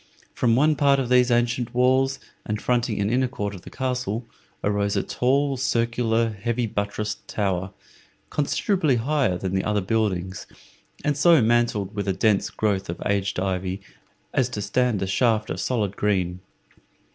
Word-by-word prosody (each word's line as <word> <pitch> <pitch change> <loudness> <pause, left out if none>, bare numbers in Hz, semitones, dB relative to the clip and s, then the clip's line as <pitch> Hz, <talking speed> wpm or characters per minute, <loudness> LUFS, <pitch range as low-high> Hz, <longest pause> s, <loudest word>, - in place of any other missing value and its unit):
From 115 -2 +2
one 150 +4 +4
part 140 -1 +4
of 130 -3 -2
these 125 0 +4
ancient 120 0 0
walls, 130 +2 +3 0.3
and 105 0 -3
fronting 120 -3 0
an 100 +1 0
inner 130 +1 +2
court 105 -5 -4
of 95 - -9
the - - -11
castle, 125 -3 -3 0.4
arose 100 0 0
a - - +1
tall, 135 +2 +1
circular, 115 -2 +1
heavy 115 +3 -2
buttressed 105 0 -3
tower, 95 -2 -1 0.6
considerably 155 - +1
higher 130 -5 +1
than 95 +1 -4
the 95 - +1
other 105 -1 +1
buildings, 95 -3 -1 0.6
and 150 -1 +2
so 165 +2 +5
mantled 115 -4 +1
with 100 -1 -3
a 95 - +2
dense 105 +1 +2
growth 100 -4 -1
of 85 - -4
aged 100 -2 0
ivy 95 0 -2 0.5
as 130 -1 +2
to 105 -4 -4
stand 115 -1 +1
a - - 0
shaft 110 +2 +1
of - - -3
solid 105 -6 -1
green. 90 -4 0
115 Hz, 160 wpm, -24 LUFS, 100-125 Hz, 0.6 s, so